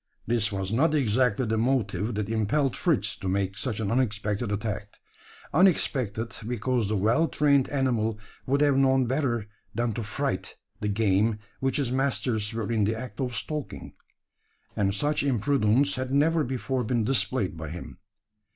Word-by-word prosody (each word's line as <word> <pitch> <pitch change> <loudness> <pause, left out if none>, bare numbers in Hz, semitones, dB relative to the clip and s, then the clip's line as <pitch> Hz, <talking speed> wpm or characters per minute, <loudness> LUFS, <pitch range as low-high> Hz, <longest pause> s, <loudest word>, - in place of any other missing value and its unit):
This 115 -2 +1
was 95 +1 -3
not 155 +6 +3
exactly 125 -2 +2
the 110 0 0
motive 115 -4 0
that 105 -1 -2
impelled 115 +6 +1
Fritz 110 - +1
to 95 - -6
make 95 0 0
such 110 +1 -2
an 105 -3 -1
unexpected 105 -3 0
attack 105 0 -4 0.6
unexpected, 125 - +2
because 120 -2 0
the 110 - +1
well 115 - +3
trained 140 -4 +2
animal 120 -6 0 0.3
would 140 +2 +2
have 145 -2 +4
known 135 -1 +4
better 120 -4 -1 0.3
than 120 -1 0
to 115 - -3
fright 135 +7 -3 0.2
the 105 - -2
game 105 +1 +2 0.2
which 135 0 0
his 135 -4 0
masters 125 -5 0
were 115 -1 -3
in 110 -2 +2
the 110 +2 0
act 125 -1 -6
of 125 -2 -2
stalking; 150 +2 -5 0.8
and 100 -1 +1
such 145 +8 +1
imprudence 135 0 +2
had 130 0 -3
never 155 +4 +3
before 130 0 -2
been 120 0 0
displayed 105 - 0
by 80 -1 -6
him. 90 +2 -8
115 Hz, 160 wpm, -27 LUFS, 105-135 Hz, 0.8 s, have